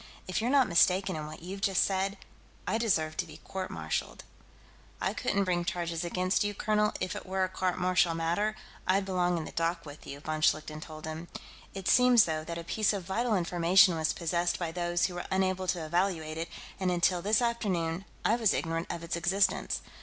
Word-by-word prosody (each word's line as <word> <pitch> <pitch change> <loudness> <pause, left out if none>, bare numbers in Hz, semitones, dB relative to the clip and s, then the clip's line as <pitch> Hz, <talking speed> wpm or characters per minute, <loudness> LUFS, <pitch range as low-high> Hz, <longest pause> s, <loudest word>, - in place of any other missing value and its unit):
If 185 - -1
you're 235 - 0
not 270 -2 +4
mistaken 185 +1 +3
in 155 -1 -5
what 155 +1 -10
you've 195 +3 -6
just 195 -1 +3
said, 195 +1 -1 0.5
I 220 - 0
deserve 160 -9 +1
to 175 - 0
be 155 - -11
court 190 -1 -5
martialed." 80 -1 -3 0.8
"I - - 0
couldn't 200 0 0
bring 175 -2 0
charges 170 -1 -2
against 185 +3 +1
you, 205 0 -2
colonel; 210 +1 +1
if 185 - -2
it - - -5
were 190 0 0
a - - +2
court 185 -1 -1
martial 180 -2 +2
matter, 175 +7 0 0.3
I'd 190 +1 +2
belong 180 -2 +1
in 160 - -3
the - - -8
dock 165 0 -1
with 145 0 -11
you," 140 - -7
von 155 +1 -4
Schlichten 155 0 +1
told 155 -1 -9
him. 160 +2 -6 0.5
"It 195 -2 -5
seems, 250 -3 +6
though, 155 -1 -2
that 170 +1 -5
a 170 - -5
piece 215 +5 +1
of 195 -2 -3
vital 220 +5 0
information 175 +1 +4
was 160 -1 +1
possessed 175 +1 0
by 170 -2 -3
those 175 0 0
who 185 - -2
were 175 - -5
unable 185 0 0
to 175 -3 -1
evaluate 160 -2 -1
it, 165 - -3 0.3
and 190 -1 +1
until 175 0 +2
this 210 +3 +3
afternoon, 195 -7 -1 0.2
I 225 - +3
was 225 -5 +3
ignorant 165 0 -2
of 170 - -4
its 170 - -2
existence. 190 +4 +1
180 Hz, 205 wpm, -30 LUFS, 165-195 Hz, 0.8 s, seems